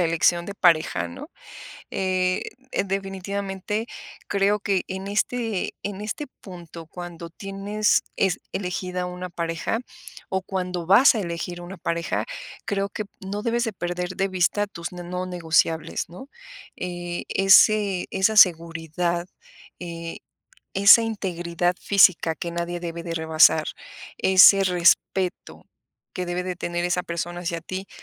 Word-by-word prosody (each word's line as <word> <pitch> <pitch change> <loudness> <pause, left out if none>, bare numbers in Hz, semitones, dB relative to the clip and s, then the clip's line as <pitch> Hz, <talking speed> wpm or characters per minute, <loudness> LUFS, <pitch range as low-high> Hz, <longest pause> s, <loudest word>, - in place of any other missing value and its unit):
la - - +3
elección 170 +1 +2
de 200 - -7
pareja, 165 - +2
¿no? 85 - -10 0.6
Eh, 185 -1 0 0.4
definitivamente, 195 +2 -3 0.4
creo 200 +1 +2
que 195 -2 0
en 190 +1 -5
este 220 0 -1
en 205 -1 -5
este 220 +8 -4 0.2
punto, 170 -3 -10
cuando 170 0 -8
tienes 200 +3 0
es 190 -3 +1
elegida 180 -1 -3
una 180 0 -6
pareja, 170 +6 -2 0.5
o 190 0 -1
cuando 180 -2 -3
vas 210 +11 +7
a 220 - -1
elegir 175 -1 -4
una 180 +1 -9
pareja, 170 0 -2 0.4
creo 200 -1 -1
que 215 - -4 0.2
no 200 +2 -5
debes 235 +1 0
de 225 - -2
perder 175 -1 -3
de 195 - +1
vista 185 +2 +1
tus 170 -3 -7
ne 180 0 -7
no 180 +1 -4
negociables, 165 -2 0
¿no? 185 +11 -11 0.5
Eh, 175 -1 -5
ese 195 0 +5
esa 195 +3 +1
seguridad, 170 -1 +3 0.5
eh, 170 -1 -6 0.6
esa 200 +4 +8
integridad 175 -5 -1
física, 185 -5 +4
que 170 +2 -5
nadie 170 +1 -3
debe 170 -1 -5
de 170 -1 -4
rebasar. 160 -1 +4 0.5
Ese 190 +1 +7
respeto, 180 0 +1 0.5
que 180 - -3
debe 175 +1 -2
de 180 -1 -3
tener 175 0 -2
esa 180 0 0
persona 175 +1 -4
hacia 170 -1 -3
ti. 185 +3 -6
180 Hz, 135 wpm, -24 LUFS, 170-195 Hz, 0.6 s, esa